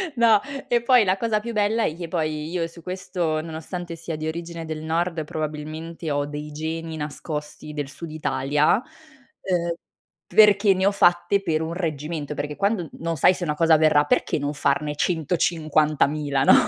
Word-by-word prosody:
No, 225 -3 +5 0.3
e 240 -1 +2
poi 245 -1 +5
la 190 0 +1
cosa 215 0 0
più 235 +2 -6
bella 215 +2 +1
è 155 - -1
che 170 -1 -6
poi 155 -2 -2
io 170 -1 -1
su 170 0 -14
questo, 180 -3 -2
nonostante 165 +2 -6
sia 165 -1 -5
di 155 +1 -4
origine 170 0 -5
del 155 -1 -5
nord 165 0 -1
probabilmente 155 +2 -5
ho 145 0 0
dei 150 +1 -6
geni 160 +1 -4
nascosti 150 0 -6
del 145 -2 -3
sud 165 +2 -8
Italia, 150 - +1 0.6
uhm, 170 -2 0 0.5
perché 205 -2 +6
ne 190 +1 0
ho - - +4
fatte 195 +1 +3
per 155 -2 0
un 160 +1 -3
reggimento, 155 -3 -3
perché 145 0 -4
quando 200 -6 0
non 165 0 -3
sai 180 - +5
se 180 - -5
una 150 -3 0
cosa 165 0 +5
verrà, 150 -1 +4
perché 145 - +1
non 145 +1 -2
farne 145 +1 0
150.000, 155 -3 +1
no? - - +7
160 Hz, 175 wpm, -24 LUFS, 150-180 Hz, 0.6 s, no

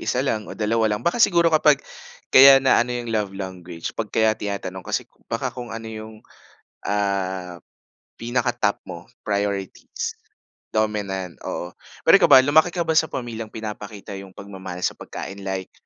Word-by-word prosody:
1 130 +2 +1
lang 110 -5 -2
o - - -8
2 110 +1 +1
lang. 110 - -10
Baka 200 +8 +1
siguro 170 -5 +4
kapag, 150 -2 +4 0.5
kaya 135 +1 +10
na 130 - +5
ano 120 - 0
yung 120 -2 -4
love 105 -2 0
language 90 -3 -6
'pag 110 -2 -4
kaya 110 +1 +3
tinatanong 100 -3 -5
kasi - - -2 0.2
baka - - -2
kung 125 -1 -7
ano 115 0 -7
yung, 110 0 -8 0.7
ah, 95 -3 -2 0.6
pinaka-top 120 -2 0
mo. 85 0 -9 0.2
Priorities, 100 -2 -3 0.6
dominant, 100 -4 -2
oo. 90 +1 -4 0.3
Pero - - +5
ikaw - - +5
ba 130 - +10
lumaki 160 +5 +4
ka 175 - +1
ba - - +2
sa 160 - +4
pamilyang 115 -3 -5
pinapakita 105 -2 -7
yung 95 -1 -12
pagmamahal 95 -3 -8
sa - - +2
pagkain, 100 +1 -7
like 95 -1 -4
105 Hz, 160 wpm, -23 LUFS, 95-120 Hz, 0.7 s, kaya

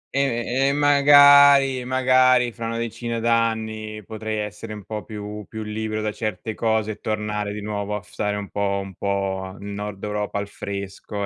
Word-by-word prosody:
E 135 0 +1
e 140 - +2
magari 140 -2 +6
magari 130 -1 +3
fra 115 0 -6
una 115 - -3
decina 115 0 -3
d'anni 110 -2 -1
potrei 110 0 -4
essere 105 +1 -7
un 105 - -9
po' 105 +2 -6
più 105 0 -7
più 110 -1 -6
libero 110 0 -3
da 105 - -1
certe 110 0 -4
cose 110 -1 0
e 105 - -9
tornare 105 -1 -2
di 105 - -6
nuovo 105 0 -3
a 105 - -4
f - - -21
stare 105 -1 -2
un 100 -1 -7
po' 100 -1 -1
un 95 -1 -10
po' 95 -1 -3
nel 100 +1 -8
Nord 105 -1 -6
Europa, 105 -1 -3
al 100 - -3
fresco, 100 +1 -6
110 Hz, 180 wpm, -23 LUFS, 105-115 Hz, -, magari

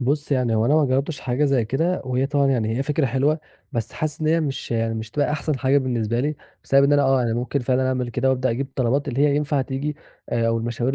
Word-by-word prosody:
بُص 145 +3 0
يعني، 125 -4 +1
هو 110 +1 +2
أنا 145 - +3
ما 155 -2 +4
جرَّبتِش 135 +2 -1
حاجة 130 +3 0
زي 135 -5 +2
كده 160 +10 -1
وهي 130 +1 0
طبعًا 140 -1 +1
يعني 115 -4 0
هي - - +1
فكرة 150 0 0
حلوة، 140 +5 +1 0.3
بس 115 -1 -3
حاسِس 155 0 -3
إن 155 - -1
هي 165 +2 +3
مش 140 -4 -4
يع 115 -1 0
مش 110 0 -5
هتبقى 145 +2 0
أحسن 150 -2 -1
حاجة 135 +1 +3
بالنسبة 120 -3 -1
لي، 150 +3 -1 0.3
بسبب 140 0 +4
إن 140 - +3
أنا 145 0 +4
آه، 135 -2 +3
أنا 115 -1 0
ممكن 125 +3 -1
فعلًا 130 +1 +1
أعمل 125 -2 -1
كده 125 +3 0
وأبدأ 130 -1 +1
أجيب 130 +4 -2
الطلبات 135 +1 -1
اللي 130 +1 -2
هي 145 0 +3
ينفع 145 -2 0
تيجي، 145 +3 -4 0.3
آآ، 115 -1 +1
والمشاوير 120 +3 -1
135 Hz, 245 wpm, -22 LUFS, 120-145 Hz, 0.3 s, ما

